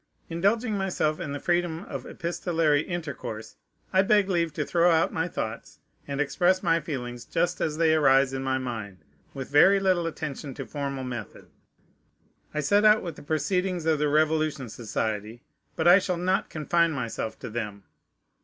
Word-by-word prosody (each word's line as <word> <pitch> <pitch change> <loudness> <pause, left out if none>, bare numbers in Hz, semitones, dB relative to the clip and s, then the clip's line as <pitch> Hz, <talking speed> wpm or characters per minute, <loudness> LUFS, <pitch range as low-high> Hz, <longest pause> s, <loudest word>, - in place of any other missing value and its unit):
Indulging 205 +7 +1
myself 185 -5 0
in 160 -5 -4
the 145 - -4
freedom 175 0 0
of - - -7
epistolary 165 -3 0
intercourse, 140 -10 -6 0.4
I 190 - +6
beg 200 0 +3
leave 170 -3 +1
to 150 -1 -2
throw 170 +3 +3
out 165 -1 +2
my 160 +1 0
thoughts 110 -9 -5 0.3
and 140 0 -4
express 180 +5 +2
my 165 -1 +3
feelings 125 -6 -5
just 170 +6 -1
as 155 -1 -1
they 160 -1 +4
arise 135 -3 +4
in 135 - -3
my 130 0 0
mind, 110 -7 -5 0.4
with 135 0 -6
very 190 +7 +6
little 185 -3 +2
attention 150 -3 -5
to 135 - -6
formal 140 +2 -4
method. 120 -5 -7 1.0
I 150 - -2
set 200 +9 +3
out 215 0 +6
with 170 -4 -5
the - - -12
proceedings 175 +4 -1
of 160 -2 +2
the 150 0 +1
Revolution 155 -3 +1
Society; 110 0 -4 0.3
but - - +1
I 180 +3 +8
shall 185 -2 -2
not 185 +2 0
confine 165 +2 +1
myself 115 -4 -4
to 125 - -8
them. 105 -3 -5
155 Hz, 170 wpm, -26 LUFS, 135-175 Hz, 1.0 s, I